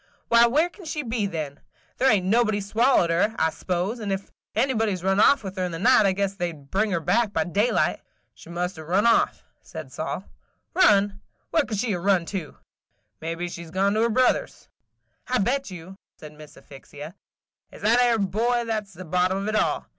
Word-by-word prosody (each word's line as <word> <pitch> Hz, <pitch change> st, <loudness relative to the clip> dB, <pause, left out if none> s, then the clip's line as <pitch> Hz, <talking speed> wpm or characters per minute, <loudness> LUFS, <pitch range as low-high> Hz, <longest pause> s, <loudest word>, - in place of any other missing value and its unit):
Why, 235 Hz, 0 st, +6 dB
where 300 Hz, +8 st, +2 dB
can 360 Hz, +1 st, -15 dB
she 305 Hz, -1 st, -3 dB
be 225 Hz, -4 st, -1 dB
then? 155 Hz, -6 st, -5 dB, 0.4 s
There 265 Hz, -, +4 dB
ain't 200 Hz, -4 st, +2 dB
nobody 215 Hz, +1 st, +2 dB
swallowed 205 Hz, -3 st, +2 dB
her, 205 Hz, +6 st, +1 dB
I 160 Hz, 0 st, +2 dB
s'pose; 185 Hz, +8 st, -3 dB
and 205 Hz, -3 st, -4 dB
if 195 Hz, 0 st, -4 dB, 0.2 s
anybody 225 Hz, -6 st, +1 dB
's 180 Hz, -, -9 dB
run 195 Hz, +1 st, +2 dB
off 275 Hz, +3 st, +5 dB
with 190 Hz, 0 st, -7 dB
her 185 Hz, -, -1 dB
in 180 Hz, -, -2 dB
the 165 Hz, -, -5 dB
night, 220 Hz, +2 st, +5 dB
I -, -, +3 dB
guess 195 Hz, +1 st, -1 dB
they 175 Hz, -3 st, -3 dB
'd 140 Hz, -3 st, -17 dB
bring 215 Hz, +3 st, +1 dB
her 175 Hz, -4 st, 0 dB
back 205 Hz, +7 st, +1 dB
by 160 Hz, -, +1 dB
daylight." 205 Hz, +8 st, +1 dB, 0.3 s
"She -, -, -15 dB
must 175 Hz, 0 st, -3 dB
'a' -, -, -7 dB
run 185 Hz, +7 st, +1 dB
off," 235 Hz, -, +2 dB, 0.2 s
said -, -, -9 dB
Sol. -, -, -4 dB, 0.5 s
"Run! 205 Hz, -, +3 dB, 0.3 s
Where 320 Hz, -3 st, +2 dB
could 215 Hz, -, -4 dB
she 215 Hz, +1 st, -1 dB
'a' 180 Hz, -, -2 dB
run 185 Hz, -1 st, +2 dB
to?" 175 Hz, -7 st, -5 dB, 0.6 s
"Mebbe 165 Hz, +2 st, -3 dB
she 170 Hz, 0 st, -7 dB
's 165 Hz, -, -12 dB
gone 195 Hz, +4 st, +1 dB
to 215 Hz, -, +1 dB
her 230 Hz, -, +2 dB
brother 255 Hz, -, +2 dB
's." -, -, -22 dB, 0.6 s
"I 255 Hz, -, +1 dB
bet 255 Hz, +6 st, 0 dB
you," 185 Hz, +1 st, -10 dB, 0.2 s
said 150 Hz, -1 st, -11 dB
Miss 150 Hz, 0 st, -14 dB
Asphyxia, 145 Hz, +3 st, -11 dB, 0.6 s
"it -, -, -12 dB
's -, -, -14 dB
that 230 Hz, +4 st, +4 dB
'ere 240 Hz, -2 st, +3 dB
boy 230 Hz, +5 st, 0 dB
that 215 Hz, -2 st, -2 dB
's 200 Hz, -, -19 dB
the 185 Hz, +2 st, -10 dB
bottom 180 Hz, +3 st, +1 dB
of 195 Hz, +1 st, -3 dB
it 215 Hz, -, -1 dB
all. -, -, 0 dB
200 Hz, 220 wpm, -24 LUFS, 175-230 Hz, 0.6 s, Why